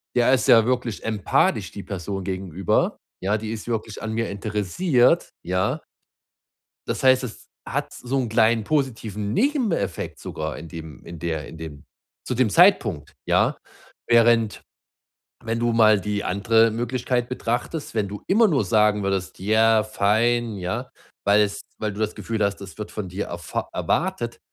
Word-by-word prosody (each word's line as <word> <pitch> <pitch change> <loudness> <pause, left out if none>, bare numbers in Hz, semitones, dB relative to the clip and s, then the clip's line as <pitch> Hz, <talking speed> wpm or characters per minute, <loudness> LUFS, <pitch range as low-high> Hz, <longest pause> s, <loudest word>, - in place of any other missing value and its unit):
der 125 +1 +4
ist 130 - +2
ja 115 -2 +7
wirklich 125 -3 -1
empathisch, 105 -4 +1
die - - -8
Person 95 0 -5
gegenüber, 95 -2 -1 0.3
ja? 105 +3 +1
Die 110 0 -5
ist 110 +1 -7
wirklich 110 -2 -3
an 110 - -3
mir 115 +1 -1
interessiert“, 110 - +1
ja? 95 - 0 1.1
Das - - -3
heißt, 130 0 +5
das 115 - -8 0.2
hat - - -2
so 130 +2 -3
'nen 125 -4 -1
kleinen 110 0 +3
positiven 110 -7 -2
Nebeneffekt, 255 - 0
sogar - - -5
in 80 +2 -9
dem 80 -4 -9
in 85 -1 -9
der 80 -3 -3
in 80 - -11
dem 75 -3 -9 0.4
zu - - -2
dem 125 -3 +2
Zeitpunkt, 110 - +3
ja, - - +2 0.5
während, 115 -2 +4 0.8
wenn 115 0 -1
du 120 0 +1
mal 110 -2 +5
die 105 +2 -2
andere 110 +4 +3
Möglichkeit 120 +1 -1
betrachtest, 125 +5 -3
wenn 105 -3 +1
du 105 +1 -7
immer 220 +4 +5
nur 145 - +1
sagen 105 +2 +3
würdest: 95 -2 -2
„Ja, 110 +2 +4
fein“ 110 +2 +1
ja, 90 -1 -4 0.4
weil 105 +1 +5
es 100 0 -2 0.2
weil 105 -2 -2
du 100 - -9
das 110 0 -1
Gefühl 110 -2 -2
hast, 100 0 -1
das 100 +2 -10
wird 105 - -6
von 105 -3 -5
dir 95 +3 -4
erfa 85 -3 -5
erwartet, - - -1
110 Hz, 160 wpm, -23 LUFS, 100-120 Hz, 1.1 s, ja